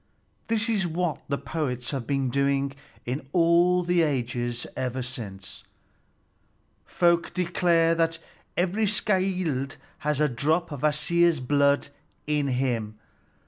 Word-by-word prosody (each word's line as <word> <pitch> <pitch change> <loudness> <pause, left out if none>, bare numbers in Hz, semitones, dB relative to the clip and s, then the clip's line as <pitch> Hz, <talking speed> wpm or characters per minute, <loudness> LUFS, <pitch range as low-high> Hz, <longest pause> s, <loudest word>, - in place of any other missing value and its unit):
This 225 0 +1
is 205 -6 +1
what 170 -1 -2
the 140 - 0
poets 125 -7 -3
have 135 -5 -4
been 135 -3 0
doing 140 +1 +1 0.3
in 130 +3 -4
all 175 +1 +4
the 175 0 +2
ages 120 -5 -1
ever 130 0 -2
since. 100 -6 -7 1.2
Folk 170 -1 +2
declare 170 -2 +2
that 165 0 +1 0.4
every 190 +5 +1
skald 185 - 0 0.2
has 150 -1 -1
a 150 - +4
drop 155 +7 0
of 145 -3 -6
Kvasir's 165 +2 +3
blood 140 +2 +2 0.4
in 150 -1 0
him. 120 -5 -1
150 Hz, 120 wpm, -26 LUFS, 130-175 Hz, 1.2 s, all